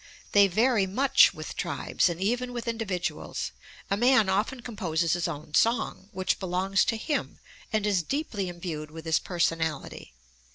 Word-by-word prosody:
They 200 -1 +6
vary 215 +1 +2
much 270 +7 +5
with - - -8
tribes - - 0
and 170 0 -4
even 245 +5 -1
with 240 -1 -5
individuals. 225 -6 -3 0.4
A - - +4
man 235 -2 +4
often 215 +6 0
composes 170 -9 -1
his 175 0 0
own 150 -2 -7
song, 225 -1 +1
which 185 -3 -1
belongs 190 +1 +1
to 225 - 0
him 290 +6 -3 0.3
and 215 -2 0
is 200 -4 +2
deeply 205 - -3
imbued 170 -3 -5
with 160 +1 -10
his 160 0 +2
personality. 160 - -2
195 Hz, 155 wpm, -27 LUFS, 170-230 Hz, 0.4 s, They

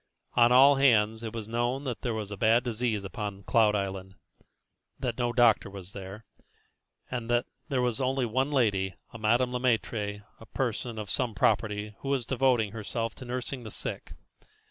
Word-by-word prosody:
On 120 0 +5
all 135 +3 +7
hands 110 -5 +3
it 115 -2 -5
was 110 -2 -6
known 120 +4 -1
that 125 -5 -4
there 120 -3 -2
was 105 -2 -4
bad 115 +4 +3
disease 115 -3 -1
upon 100 +1 -5
Cloud 110 -1 +3
Island, 95 -1 -4 0.8
that - - -3
no 120 -1 +1
doctor 120 -4 +4
was 95 -1 -10
there, 100 +3 -8 0.9
and 120 -2 -4
that 120 +1 +2 0.2
there 130 -3 +1
was 120 -3 0
one 130 0 0
lady, 100 - +1 0.2
a 115 - -8
Madame 120 +4 +2
Le 125 - -1
Maître, 110 -4 -1 0.2
a 115 - -12
person 120 -2 -3
of 105 -2 -4
some 120 -4 +1
property, 105 0 +1
who 135 - -5
was 135 -4 0
devoting 125 -5 +2
herself 115 +1 -3
to 130 - -11
nursing 125 +1 -4
the 110 - -8
sick. - - -6
115 Hz, 170 wpm, -28 LUFS, 105-125 Hz, 0.9 s, all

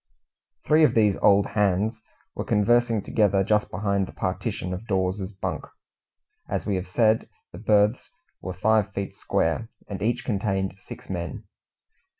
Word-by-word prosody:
Three 155 +1 +5
of 150 - +4
these 105 -3 +4
Old 100 0 +5
Hands 105 +2 +1 0.4
were - - -4
conversing 115 +1 +2
together 100 -3 +2
just 105 +1 +1
behind 100 -2 -1
the - - -10
partition 90 0 -3
of 95 +6 -7
Dawes's 95 0 -1
bunk. 95 - -4 0.9
As - - -2
we 100 - 0
have 90 0 -5
said, 110 +3 +2 0.2
the 85 - -10
berths 105 +2 +2 0.3
were 95 -1 -5
five 105 +1 +2
feet 100 0 -4
square, 95 +8 -1 0.2
and 100 -2 -6
each 120 +3 -1
contained 95 -4 -1
six - - -11
men. - - -5
100 Hz, 150 wpm, -25 LUFS, 95-110 Hz, 0.9 s, Three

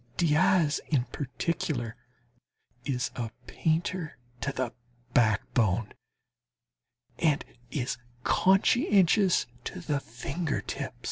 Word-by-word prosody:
Diaz 155 -1 +3
in 140 -6 +2
particular 130 -4 -2 0.9
is 125 -2 -1
a 120 -2 -3 0.2
painter 165 +2 -1 0.2
to 140 - -1
the 130 -3 -2 0.4
backbone, 110 -2 +2 1.3
and 155 -4 +2 0.2
is 130 -1 -2 0.2
conscientious 195 -1 +4 0.2
to 185 - -5
the 150 -5 -1
finger 140 +6 -3
tips. - - -5
145 Hz, 85 wpm, -29 LUFS, 125-170 Hz, 1.3 s, conscientious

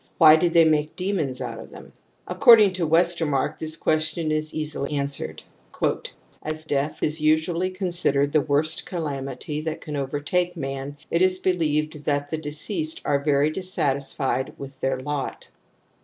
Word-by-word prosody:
Why 155 -1 +8
did 165 +1 +1
they 165 -1 +6
make 155 -1 +1
demons 180 -9 -2
out - - -5
of - - -10
them? - - -13 0.3
According 230 -7 +6
to 175 -3 -1
WestefH 170 0 +2
marck 135 -2 -1
this 160 0 -3
question 155 0 0
is 155 0 -1
easily 150 -2 -3
answered 140 0 -3 0.3
*•. - - 0
" - - -6 0.3
As 155 +1 -5
I - - -26
death 145 +2 -2
is 155 +1 0
usually 160 +4 +2
considered 175 -7 +1
the 155 - +3
worst 145 +2 -1
calamity! 145 -3 -4
that 160 0 -4
can 150 - -7
overtake 145 +6 -1
man, 135 0 -5
it 170 - +1
is 185 0 +3
believed 155 -5 -1
that 145 0 -1
the 160 - -1
j - - -8
deceased 155 +2 -1
are 145 -1 +2
very 145 0 +2
dissatisfied 140 -6 -2
with 135 -1 -10
their 135 -1 -1
lot. 145 +1 -5
155 Hz, 170 wpm, -24 LUFS, 145-170 Hz, 0.3 s, Why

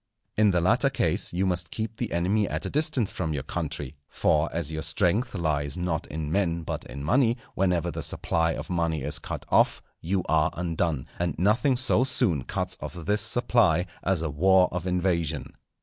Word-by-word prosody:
In 105 -1 +4
the 90 -3 +2
latter 90 - +3
case - - 0
you 90 +2 0
must 90 -2 0
keep 110 +2 -4
the 120 - -3
enemy 95 +5 +1
at - - -3
a - - -4
distance 145 -7 +1
from 80 -4 -3
your 70 - -3
country, 70 0 -4
for 75 +1 +1
as 80 -2 -2
your 80 0 -3
strength 105 +7 +1
lies 75 -3 -1
not 90 -3 -2
in 75 -1 -4
men 85 -3 0
but - - -4
in 70 +1 -8
money, 115 - +2 0.2
whenever 90 -3 +1
the - - -5
supply 80 0 0
of - - -6
money 85 -4 0
is 75 - +1
cut - - -6
off - - +3 0.2
you 95 +2 -1
are 80 -1 +3
undone, 85 -5 -1
and 85 -3 -1
nothing 115 - +2
so 125 -1 +2
soon 115 - +1
cuts - - -3
off - - -6
this 100 +5 +1
supply 105 -7 +3 0.2
as 95 -3 0
a 80 - -1
war 95 +4 +4
of 90 +1 -4
invasion. 85 -6 -1
90 Hz, 190 wpm, -26 LUFS, 80-100 Hz, 0.2 s, In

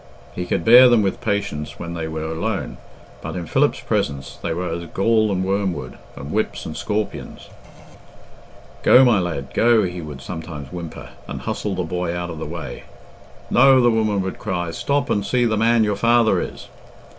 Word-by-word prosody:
He 90 0 -4
could - - -1
bear 125 +2 +9
them 120 -3 +4
with 95 - -2
patience 100 -8 -2
when 85 0 -6
they 80 -1 -4
were 80 0 -4
alone, 90 +7 -3 0.4
but - - -6
in 90 -2 -4
Philip's - - +1
presence 70 -1 -2
they - - -2
were 90 +2 -2
as 85 +1 -4
gall 110 +4 +2
and 95 -1 0
wormwood, 95 -8 -2 0.2
and - - -8
whips - - -2
and 80 - -6
scorpions. 105 0 -4 1.3
"Go, 130 +1 +7
my 115 -5 +4
lad, 80 -7 -4
go," 115 -2 +4
he 90 -1 -4
would 75 -3 -8
sometimes 80 -5 -7
whimper, 85 -2 -7 0.2
and - - -6
hustle 105 -2 -3
the 90 - -1
boy 85 0 -3
out 85 0 -4
of 80 - -7
the 80 - -5
way. - - -7 0.7
"No," 135 +1 +6
the 120 -1 +4
woman 110 -3 +1
would 95 - -5
cry, 90 -4 -3
"stop 140 +9 -1
and 100 - +1
see 120 +4 +1
the 110 -2 +1
man 115 +1 +3
your 105 -1 0
father 115 +2 +3
is." - - -7
95 Hz, 185 wpm, -21 LUFS, 85-110 Hz, 1.3 s, bear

